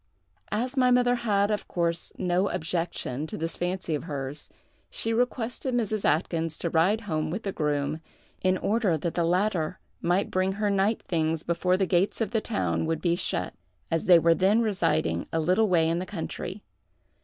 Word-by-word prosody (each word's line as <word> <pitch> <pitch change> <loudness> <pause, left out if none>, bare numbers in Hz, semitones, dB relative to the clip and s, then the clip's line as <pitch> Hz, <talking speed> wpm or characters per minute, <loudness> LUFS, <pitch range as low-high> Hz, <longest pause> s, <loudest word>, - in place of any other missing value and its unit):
As 250 +5 -1
my 255 -2 +4
mother 245 0 +4
had, 210 -4 +1
of 210 - -2
course, 170 -1 -1
no 185 +1 +1
objection 165 -5 -3
to - - -6
this 165 +1 -3
fancy 180 -1 -2
of 150 - -2
hers, 140 -2 -5 0.4
she 225 - -2
requested 245 +1 -1
Mrs. 215 -3 0
Atkyns 165 0 0
to 170 - -2
ride 185 +7 +3
home 155 -6 -2
with 195 +7 -4
the 195 - -2
groom, 150 -1 -1 0.4
in 185 0 +2
order 205 -4 +1
that 165 +2 -3
the 170 - +1
latter 180 -1 +1 0.2
might 180 +3 +1
bring 185 +1 +1
her 205 +1 0
night 200 +3 +1
things 160 -2 -1
before 180 +2 +1
the 190 - +2
gates 185 +2 +1
of 220 -3 -1
the 225 -2 +1
town 205 -7 -1
would 160 -1 0
be 170 0 +1
shut, 90 - -2 0.4
as 165 -1 0
they 180 -2 +8
were 165 0 +4
then 200 +6 +3
residing 165 - 0
a 165 - 0
little 185 +7 +2
way 165 -3 +3
in 165 +1 +1
the 185 - -4
country. 185 +2 -5
180 Hz, 185 wpm, -27 LUFS, 165-210 Hz, 0.4 s, they